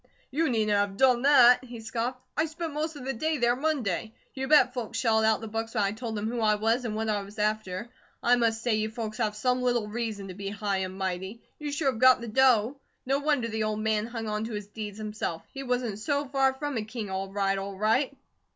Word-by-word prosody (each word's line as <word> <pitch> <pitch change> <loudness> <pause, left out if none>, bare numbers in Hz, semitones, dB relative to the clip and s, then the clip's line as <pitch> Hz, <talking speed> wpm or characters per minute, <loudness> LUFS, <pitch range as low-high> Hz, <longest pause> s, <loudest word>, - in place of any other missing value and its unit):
"You 315 +3 +1
needn't 215 -3 +2
have 200 -1 0
done 250 -1 +4
that," 255 -3 +7
he 240 -2 -9
scoffed. 230 +3 -3 0.2
"I 310 - +2
spent 325 0 -5
most 310 +1 -2
of 270 -3 -8
the 270 - -1
day 310 +6 -1
there 240 -1 +3
Monday. 245 - -1 0.2
You 265 0 -3
bet 290 -4 +5
folks 235 -2 -4
shelled 220 -2 +2
out 220 0 +3
the 225 - -5
books 225 +2 -4
when 215 - +2
I 200 - +1
told 225 +1 -5
them 210 +1 -2
who 240 +1 -2
I 215 -1 +4
was, 225 +4 +1
and 215 -2 -2
what 220 +1 -2
I 210 -2 0
was 200 +2 -11
after. 210 -1 -1 0.4
I 245 +1 +5
must 230 -2 +1
say 240 - +2
you 215 0 0
folks 220 -1 -5
have 215 -2 0
some 250 +3 +1
little 240 -3 +1
reason 215 -3 -4
to - - -6
be 195 +1 -5
high 200 -1 -1
and 190 0 -4
mighty. 190 +3 -4 0.2
You 295 -1 -4
sure 285 -1 +1
have 225 - -8
got 255 0 +7
the 235 - -6
dough. 250 +1 +3 0.3
No 270 +2 +1
wonder 285 -5 +1
the 220 -1 -3
old 215 0 -1
man 215 0 0
hung 230 -2 -5
on 210 0 -2
to 225 - -6
his 210 -1 -4
deeds 210 0 -7
himself. 210 -6 -4
He 270 - -5
wasn't 245 -5 -2
so 285 +5 0
FAR 270 0 +2
from 290 -1 -3
a 220 - -1
King, 220 -2 -6
all 190 0 -3
right, 195 -1 0
all 195 0 -6
right." 250 +7 +1
225 Hz, 245 wpm, -28 LUFS, 210-255 Hz, 0.4 s, that